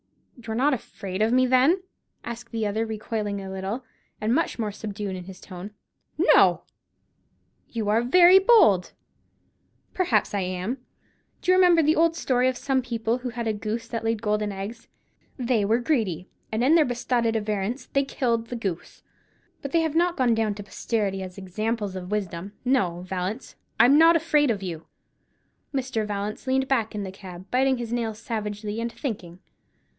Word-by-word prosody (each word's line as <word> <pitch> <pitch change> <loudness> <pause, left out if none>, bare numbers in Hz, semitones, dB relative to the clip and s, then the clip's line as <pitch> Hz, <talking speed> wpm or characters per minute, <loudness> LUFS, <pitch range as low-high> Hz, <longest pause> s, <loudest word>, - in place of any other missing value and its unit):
"You're 220 0 -4
not 275 +5 +3
afraid 200 -5 -5
of 220 +1 +3
me, 255 +1 +4
then?" 265 +9 +3 0.4
asked 235 0 -7
the 225 -1 -1
other, 215 +2 0
recoiling 215 -2 -3
a 190 -1 -7
little, 190 +6 -4 0.4
and 215 +2 0
much 330 +5 0
more 215 -3 -2
subdued 205 -2 -5
in 180 -1 -7
his 190 0 -10
tone. 185 +1 -9 0.5
"No!" - - +5 1.1
"You 225 -3 -3
are 220 +2 +3
very 355 +9 +7
bold." 380 - +5 1.0
"Perhaps 235 - +1
I 200 - 0
am. 185 +7 -3 0.6
Do 365 - +3
you - - +6
remember 355 -3 +5
the 310 +2 +3
old 330 0 +3
story 255 -5 +1
of 255 - -3
some 270 -2 0
people 235 -1 -2
who 250 0 -4
had 235 0 -4
a 220 - +1
goose 220 +2 -4
that 230 -2 -3
laid 225 -1 -1
golden 210 -1 0
eggs? 200 +4 -7 0.5
They 240 -4 +1
were 220 +3 +3
greedy, 220 - -1 0.2
and, 220 +2 0
in 280 +5 +5
their 325 -2 +6
besotted 240 -2 0
avarice, 215 +4 -2
they 275 - +3
killed 235 -4 -1
the 245 - -5
goose. 195 -7 -5 0.6
But 280 - -5
they 335 - +3
have 320 -2 -1
not 345 +2 +2
gone 250 -3 +3
down 220 -2 0
to 205 - -7
posterity 200 -2 -2
as 185 0 -8
examples 205 +1 -3
of 180 -1 -6
wisdom. 195 -2 -3
No, 190 -10 +1
Vallance, 185 +5 -4 0.2
I'm 275 +5 +7
not 330 +1 +7
afraid 300 -3 +3
of 205 -4 -1
you." 165 -3 -6 0.8
Mr. 255 -6 -2
Vallance 210 +4 -4
leaned 265 0 +1
back 230 -5 0
in 205 - -3
the 190 - -5
cab, 185 -2 -10
biting 265 +1 +3
his 240 -1 -4
nails 225 -3 -2
savagely, 215 -1 -4
and 235 0 -2
thinking. 205 - -5
225 Hz, 175 wpm, -25 LUFS, 205-255 Hz, 1.1 s, very